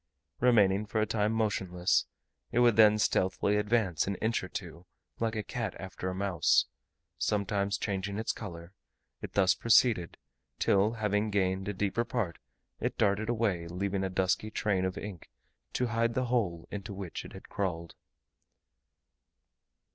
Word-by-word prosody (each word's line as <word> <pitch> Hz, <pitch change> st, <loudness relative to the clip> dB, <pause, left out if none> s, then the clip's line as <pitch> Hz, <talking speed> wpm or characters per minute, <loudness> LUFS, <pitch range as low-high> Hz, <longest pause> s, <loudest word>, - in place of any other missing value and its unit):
Remaining 105 Hz, -4 st, +4 dB
for 110 Hz, +2 st, -1 dB
a 110 Hz, -, +3 dB
time 105 Hz, 0 st, 0 dB
motionless, 95 Hz, -5 st, +1 dB, 0.4 s
it 120 Hz, -, -2 dB
would 120 Hz, -2 st, +5 dB
then 105 Hz, -1 st, +7 dB
stealthily 100 Hz, 0 st, +1 dB
advance 105 Hz, -6 st, +1 dB
an 100 Hz, -, -1 dB
inch 110 Hz, +2 st, -1 dB
or -, -, -5 dB
two, 85 Hz, 0 st, -7 dB, 0.3 s
like 115 Hz, -1 st, -1 dB
a 105 Hz, -, -2 dB
cat 110 Hz, -1 st, -4 dB
after 95 Hz, -1 st, -5 dB
a 90 Hz, -, -4 dB
mouse; 95 Hz, -3 st, +3 dB, 0.5 s
sometimes 100 Hz, -1 st, 0 dB
changing 100 Hz, 0 st, -3 dB
its 110 Hz, -, -1 dB
colour: 85 Hz, -4 st, -8 dB, 0.5 s
it -, -, -7 dB
thus 95 Hz, -2 st, +4 dB
proceeded, 110 Hz, -6 st, +3 dB, 0.4 s
till 100 Hz, +3 st, +3 dB
having 105 Hz, -1 st, 0 dB
gained 95 Hz, -1 st, 0 dB
a 105 Hz, -, -1 dB
deeper 100 Hz, +4 st, 0 dB
part, 115 Hz, -8 st, -3 dB, 0.4 s
it -, -, -2 dB
darted 105 Hz, +2 st, +1 dB
away, 105 Hz, -8 st, 0 dB
leaving 95 Hz, +3 st, -2 dB
a 95 Hz, -, -1 dB
dusky 95 Hz, +3 st, 0 dB
train 100 Hz, -4 st, 0 dB
of 95 Hz, -, -3 dB
ink 100 Hz, -5 st, -8 dB, 0.4 s
to 125 Hz, -, +1 dB
hide 115 Hz, 0 st, 0 dB
the 130 Hz, -, +1 dB
hole 105 Hz, -9 st, -1 dB
into 100 Hz, -1 st, -6 dB
which 95 Hz, -3 st, -6 dB
it -, -, -11 dB
had -, -, -11 dB
crawled. 85 Hz, -4 st, -3 dB
100 Hz, 155 wpm, -30 LUFS, 95-110 Hz, 0.5 s, then